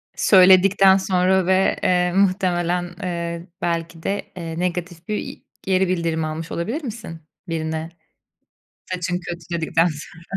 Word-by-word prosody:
Söyledikten 190 0 +6
sonra 190 -1 +2
ve, 190 +1 +2
eee, 180 -1 +2
muhtemelen, 180 -2 +1
eee, 170 -1 -4
belki 165 -1 -3
de, 200 +1 -3
eee, 165 -1 -5
negatif 175 -1 -3
bir 215 - -1
i - - -7 0.2
geri 190 0 +1
bildirim 165 -3 -1
almış 155 +1 -5
olabilir 230 - -3
misin 220 - -7 0.3
birine 160 -1 -3 1.0
"Saçın 180 0 -2
kötü." 170 -1 -7
dedikten 165 0 +1
sonra? 160 0 -7
175 Hz, 125 wpm, -21 LUFS, 165-190 Hz, 1.0 s, Söyledikten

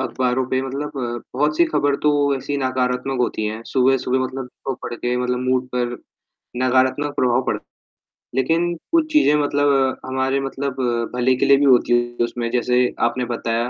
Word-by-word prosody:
अखबारों 130 0 0
पे 130 - 0
मतलब 140 +3 -4 0.4
बहुत 150 +3 +1
सी 170 - +5
खबर 145 -3 +1
तो 150 - +4 0.3
ऐसी 140 +2 -3
नकारात्मक 130 0 -1
होती 115 -3 -1
हैं, 110 +1 -4
सुबह-सुबह 130 0 +2
मतलब 130 0 -5 0.2
तो 135 - -1
पढ़ - - -5
के 120 +1 -2
मतलब 125 0 -1
मूड 130 0 +1
पर 120 -1 -1 0.7
नकारात्मक 130 +3 +2
प्रभाव 125 0 +2
पड़ - - 0 0.8
लेकिन 165 +6 +1 0.2
कुछ 325 -2 +2
चीज़ें 300 - +5
मतलब, 140 -2 +2
हमारे 130 +1 0
मतलब 135 0 -4 0.4
भले 125 +1 +2
के - - 0
लिए 140 - +6
भी 145 - +2
होती 125 -2 +4
है 120 0 -3
उसमें, 120 0 -4
जैसे 125 0 +2 0.2
आपने 125 +1 -2
बताया, 115 +1 -1
130 Hz, 165 wpm, -21 LUFS, 125-140 Hz, 0.8 s, लिए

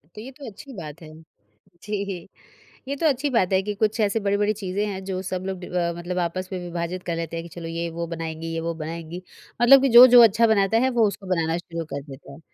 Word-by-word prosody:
तो 210 - -8
ये 255 +4 -9
तो 275 +1 -12
अच्छी 265 +6 -12
बात 160 - -9
है, 155 -1 -12 0.7
जी। 200 -4 -4 0.6
ये 280 - -2
तो 325 - -2
अच्छी 285 0 0
बात 190 -5 +2
है 190 - +4
कि 210 +1 -3
कुछ 215 +3 0
ऐसी 210 +1 +1
बड़ी-बड़ी 205 +1 +1
चीज़ें 200 0 -3
हैं 195 -2 -5
जो 190 -1 -3
सब 185 -1 -4
लोग 190 -1 -4
डिव 180 0 -8
अ, 170 0 0
मतलब 175 +1 -5
आपस 185 +2 -3
में 185 - -3
विभाजित 175 +1 -5
कर 170 - -3
लेते 165 0 -4
हैं, 165 - -4
कि 170 - -11
चलो 170 -1 -7
ये 165 +1 -3
वो 170 +1 -4
बनाएँगी 165 -1 -5
ये 165 - -2
वो 165 +1 -2
बनाएँगी 165 +2 -6 0.4
मतलब 265 +3 +8
कि 275 - +2
जो-जो 245 +1 +9
अच्छा 225 +1 +4
बनाता 215 0 +3
है, 260 +3 +2
वो 235 -4 +3
उसको 200 -1 -6
बनाना 165 -2 0
शुरू 170 -1 -6
कर 140 - -3
देता 135 +1 -11
है। 140 - -13
185 Hz, 245 wpm, -24 LUFS, 170-215 Hz, 0.7 s, जो-जो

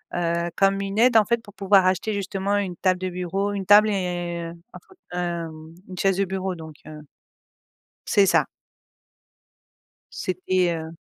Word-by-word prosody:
heu, 170 0 -1
comme 195 0 +2
une 195 +1 -4
aide, 240 -1 +5
en 210 - +5
fait, 235 -1 0
pour 205 - -15
pouvoir 195 -1 +4
acheter 190 +4 0
justement 200 0 -1
une 190 -3 -2
table 185 -1 +1
de 185 0 -3
bureau 190 +3 -2
une 195 -2 -4
table 210 +1 +7
et 175 -3 -2
heu, - - -10 0.2
un - - -10
faut, 380 - -19 0.2
hem, 165 -2 -5
une 185 - -8
chaise 195 -1 +2
de 195 - +1
bureau 190 0 -3
donc 160 -2 -11
heu 155 0 -9 1.1
c'est 200 -3 +4
ça. - - +3 1.7
C'était, 185 -1 -1
heu 160 0 -6
185 Hz, 170 wpm, -23 LUFS, 175-200 Hz, 1.7 s, table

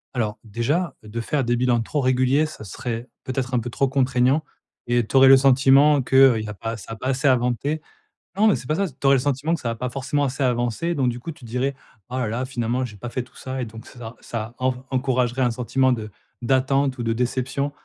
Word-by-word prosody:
Alors, 110 -3 -1
déjà, 130 - -1
de 110 +2 -5
faire 140 +3 -1
des 120 +1 +1
bilans 120 -1 +2
trop 145 +6 -2
réguliers 130 +3 +2
ça 155 -8 -9
serait, 115 +4 -5
peut-être 130 0 -3
un - - +3
peu 120 +1 -5
trop 135 +3 0
contraignant 130 +2 +2 0.4
et 120 -1 +1
tu - - -6
aurais 135 0 +8
le 135 0 +9
sentiment 135 +2 +5
qu'il 130 -3 +5
y 110 - -6
a - - -5
pas 115 +3 -5
ça 110 - -11
a - - -6
pas 130 - -5
assez 135 +2 +1
avancé. 130 +4 +1 0.5
Non 210 +3 +4
mais 210 - +4
c'est - - -7
pas 155 - +1
ça 195 +2 0
c 140 - -12
tu - - -6
aurais 135 - +6
le - - +2
sentiment 145 +4 0
que 170 - -1
ça 120 - -2
a 115 - -2
pas 125 +2 -3
forcément 135 +2 -1
assez 135 0 -1
avancé 120 +7 0
donc 130 -4 +1
du 120 0 -4
coup, 165 +7 -6
tu 135 - -14
dirais: 125 +4 -2 0.3
«Oh 125 - -4
là 125 -3 0
là, 120 +4 -2
finalement 125 -1 -2
j'ai 110 -5 -7
pas 120 +4 -6
fait 125 +1 -3
tout 125 - -22
ça» 130 0 -5
et - - -2
donc 110 0 -11
c - - -15
ça 115 0 -8
ça 115 0 -6
en 130 0 +1
v 125 - -8
encouragerait 130 -1 0
un 125 - +2
sentiment 125 +2 +1
de 110 -2 -5 0.3
d'attente 135 +2 +1
ou 120 - -3
de 115 0 0
déception. 130 +4 -1
130 Hz, 250 wpm, -23 LUFS, 120-135 Hz, 0.5 s, le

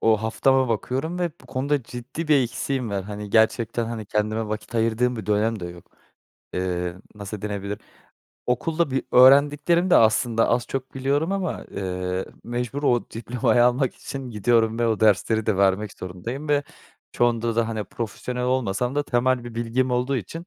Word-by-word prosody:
o 110 -1 +4
haftama 130 +4 +2
bakıyorum 135 - -2
ve 175 -2 0
bu - - -17
konuda 140 +1 -1
ciddi 125 +8 -7
bir 150 - +6
eksiğim 125 0 -2
var. 100 -1 -2
Hani, 105 +1 -7
gerçekten, 115 +1 +2
hani, 110 -3 -5
kendime 110 +1 -1
vakit 110 +2 -5
ayırdığım 115 +2 +1
bir 110 - -6
dönem 105 0 +1
de - - -5
yok. 85 -1 -12 0.7
Eee, 90 -1 -2 0.2
nasıl 100 0 -7
denilebilir? 100 -1 -4 0.7
Okulda 155 +5 0
bir 135 - 0
öğrendiklerim 145 +7 +5
de - - +7
aslında 115 +1 +3
az 120 +1 +1
çok 135 -1 -5
biliyorum 140 +7 0
ama, 190 -4 -2
eee, 90 -1 -3 0.2
mecbur 125 +4 -3
o 120 -4 +1
diplomayı 120 +1 +1
almak 125 +1 +2
için 135 -2 -7
gidiyorum 115 +1 +2
ve 120 - +2
o 110 -2 0
dersleri 110 +1 +3
de 105 -3 +2
vermek 100 +1 +2
zorundayım 115 +12 -6
ve 145 -1 +3 0.5
çoğunda 115 -1 +1
da, 115 -1 +2
hani, 110 -2 -3
profesyonel 125 +4 -4
olmasam 125 0 0
da 145 - +1
temel 125 -1 +1
bir 120 -1 -8
bilgim 120 +2 0
olduğu 125 +2 0
için, 165 - -6
120 Hz, 165 wpm, -24 LUFS, 105-130 Hz, 0.7 s, de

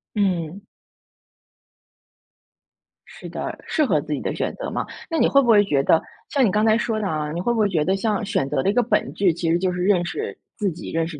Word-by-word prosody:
嗯。 185 -3 -1 2.5
是 - - -11
的， - - -5
适 305 - +1
合 160 - +2
自 150 - -4
己 - - -2
的 - - -2
选 - - -2
择 - - -5
嘛。 - - -3 0.2
那 330 - -1
你 - - +4
会 275 - +5
不 250 - -2
会 210 -3 +6
觉 145 -8 +1
得 160 - +4 0.3
像 275 -4 +3
你 195 - +2
刚 210 +2 +2
才 220 0 +4
说 225 -2 -1
的 205 - -2
啊， 150 -2 -2
你 170 +2 -3
会 240 +4 +1
不 225 - -1
会 210 - +4
觉 165 -5 +1
得 190 +4 +1
像 210 +1 -1
选 195 -9 0
择 140 -3 0
的 195 - +1
一 200 - +2
个 245 - +3
本 235 - 0
质， 190 -4 +2
其 165 0 -2
实 170 - +3
就 185 0 0
是 180 0 -3
认 185 -2 +3
识 430 - -4 0.2
自 200 -4 0
己， 160 - -8
认 165 0 0
识 155 -3 -8
195 Hz, 265 characters per minute, -22 LUFS, 165-215 Hz, 2.5 s, 会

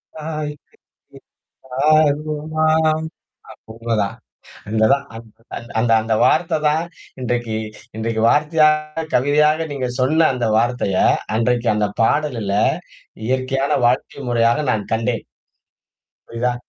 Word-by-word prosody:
தாய்க்கு 150 -2 -6 0.8
ஈடாகுமா 155 +3 +1 1.1
உண்ம 115 +1 -6
தான். 100 +4 -3 0.5
அந்த 110 0 +2
தான், 140 0 +1 0.8
அந்த 115 0 +1
அந்த 110 0 -1
வார்த்த 160 -1 +2
தான், 160 +3 +1 0.4
இன்றைக்கு, 120 -3 -2 0.4
இன்றைக்கு 110 0 -2
வார்த்தையாக, 155 +1 +2
கவிதையாக 150 +4 +3
நீங்கச் 130 -2 -4
சொன்ன 155 +5 +3
அந்த 120 -3 -1
வார்த்தைய, 115 -5 0 0.4
அன்றைக்கு 120 +1 +1
அந்தப் 105 -1 -1
பாடலுல 115 -7 0 0.7
இயற்கையான 130 +2 0
வாழ்க்கை 130 +3 -1
முறையாக 120 +4 +2
நான் 105 -2 -3
கண்டேன். 115 -1 -2 1.0
புரியுதா? 120 +1 -1
130 Hz, 95 wpm, -19 LUFS, 115-150 Hz, 1.1 s, கவிதையாக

